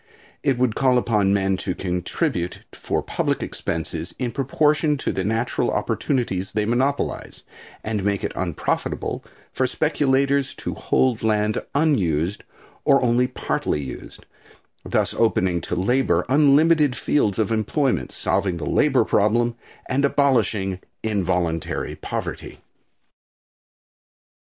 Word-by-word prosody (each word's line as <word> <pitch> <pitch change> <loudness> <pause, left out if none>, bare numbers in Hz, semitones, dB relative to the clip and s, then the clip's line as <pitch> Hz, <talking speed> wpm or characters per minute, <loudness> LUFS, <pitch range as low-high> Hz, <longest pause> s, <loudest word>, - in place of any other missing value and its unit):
It 135 -4 +1
would 125 -3 +2
call 130 0 +3
upon 105 -5 +2
men 95 -1 +1
to 90 0 -3
contribute 90 -1 -2
for - - -2
public - - -1
expenses 80 +1 -4
in 125 -2 -2
proportion 150 +3 +1
to - - -2
the 95 - -2
natural 115 +4 0
opportunities 95 -9 -1
they 105 -1 0
monopolize, 130 +5 -1 0.4
and 105 -3 -2
make 100 0 0
it - - -1
unprofitable 85 -4 -2 0.3
for 130 - +1
speculators 140 -1 +1
to - - -5
hold 125 -4 +1
land 105 -1 +1
unused 100 - +1 0.4
or 140 - +5
only 125 +1 +3
partly 75 - -2
used, 65 - -9 0.6
thus - - 0
opening 95 -6 +1
to 90 - -3
labor 95 -2 +1
unlimited 150 0 +4
fields 110 -7 +1
of 110 -1 0
employment, 110 - 0
solving 95 -3 -1
the 80 - -5
labor - - +3
problem 120 +3 +2 0.3
and 135 +2 0
abolishing 115 -9 +1 0.2
involuntary 90 -6 -1
poverty. - - -5
110 Hz, 115 wpm, -23 LUFS, 95-135 Hz, 0.6 s, or